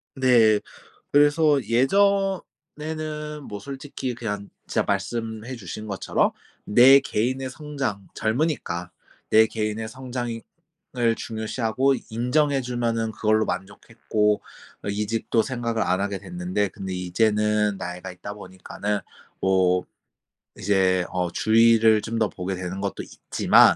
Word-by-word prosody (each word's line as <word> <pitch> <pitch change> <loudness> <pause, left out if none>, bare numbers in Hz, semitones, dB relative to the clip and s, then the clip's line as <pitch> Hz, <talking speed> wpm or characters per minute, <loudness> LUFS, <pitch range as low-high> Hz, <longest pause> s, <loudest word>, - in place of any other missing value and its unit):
네 120 -5 +5 0.5
그래서 145 0 +4
예전에는 155 -1 0
뭐 105 - -6
솔직히 135 +1 -5
그냥 105 -4 -4 0.2
진짜 - - +1
말씀해 110 +4 -3
주신 110 +1 -7
것처럼 95 -2 0 0.3
내 130 +6 +8
개인의 130 +1 -1
성장 135 -9 -4
젊으니까 110 - -1 0.4
내 110 +1 +6
개인의 110 0 -3
성장이 120 -1 -5 0.6
을 115 -2 +3
중요시하고 115 +4 0 0.2
인정해 135 +5 +1
주면은 115 -2 -1
그걸로 110 0 +2
만족했고 105 +2 -1 0.4
어 - - -5
이직도 110 +2 0
생각을 115 -3 -1
안 90 +1 +1
하게 100 -1 -1
됐는데 175 - -2
근데 95 0 -6
이제는 105 +3 +1
나이가 90 0 -6
있다 95 +3 -8
보니까는 100 +1 -4 0.4
뭐 90 -1 +3 0.7
이제 95 -2 +2
어 90 -1 -1
주위를 110 0 +5
좀 115 +1 -4
더 110 -2 +2
보게 95 +1 -4
되는 95 +2 -5
것도 100 -2 -3
있지만 - - +4
110 Hz, 265 characters per minute, -24 LUFS, 100-130 Hz, 0.7 s, 내